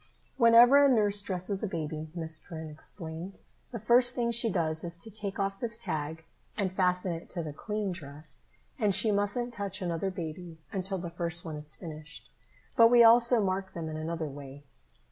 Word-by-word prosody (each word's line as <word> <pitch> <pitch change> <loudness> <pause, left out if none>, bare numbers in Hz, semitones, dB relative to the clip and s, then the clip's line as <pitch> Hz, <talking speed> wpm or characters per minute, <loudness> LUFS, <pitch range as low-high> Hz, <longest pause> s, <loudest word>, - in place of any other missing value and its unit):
"Whenever 240 +3 +7
a 280 - +6
nurse 205 -4 +3
dresses 190 0 -3
a 215 - -1
baby," 155 -3 -5
Miss 160 -2 -2
Perrin 160 -2 -8
explained, 165 +3 -7 0.3
"the 235 - -5
first 245 +3 +4
thing 235 -1 0
she 235 0 +3
does 160 -4 -1
is 170 0 -4
to 220 +6 -9
take 200 -1 -5
off 195 0 -2
this 230 -2 -3
tag 160 -1 -4 0.3
and 195 -4 0
fasten 180 -1 +1
it 165 +1 -8
to 175 -2 -3
the 150 -2 -6
clean 210 +4 -3
dress. 150 -3 -6 0.3
And 205 -4 +2
she 220 - +3
mustn't 205 +4 0
touch 200 -3 -3
another 175 0 -2
baby 170 -1 -7
until 190 0 -3
the 175 -2 -6
first 170 0 -2
one 160 -2 -5
is 150 0 -2
finished. 155 -3 -10 0.4
But 230 -2 +8
we 240 0 +6
also 235 -1 +6
mark 190 0 -3
them 165 -2 -4
in 155 - -5
another 160 +1 -3
way." 140 0 -10
185 Hz, 185 wpm, -29 LUFS, 160-215 Hz, 0.4 s, But